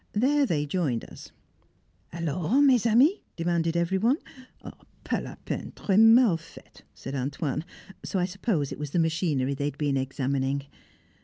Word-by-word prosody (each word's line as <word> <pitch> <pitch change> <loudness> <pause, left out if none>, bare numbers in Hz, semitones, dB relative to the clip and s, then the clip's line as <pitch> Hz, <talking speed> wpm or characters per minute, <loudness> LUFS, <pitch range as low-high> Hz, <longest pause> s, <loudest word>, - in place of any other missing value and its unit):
There 275 +6 +2
they 150 -6 0
joined 145 -7 -1
us. - - -11 0.8
"Alors, 170 - 0
mes 250 -5 +4
amis?" 265 - +4 0.2
demanded 170 -1 0
every 170 +3 +1
one. 240 +8 +3 0.9
"Pas - - -1
la - - -8
peine, - - -4
très 200 0 +1
mal 225 -4 +6
faite," 165 - -16
said 135 - -8
"Antoine"; 140 +2 -2 0.4
so - - -3
I 180 - +2
suppose 185 - -2
it - - -7
was 150 -1 -4
the 160 - -2
machinery 160 -5 0
they 140 +1 -3
had 145 -1 -3
been 145 -2 0
examining. 135 +1 -2
165 Hz, 155 wpm, -27 LUFS, 140-210 Hz, 0.9 s, mal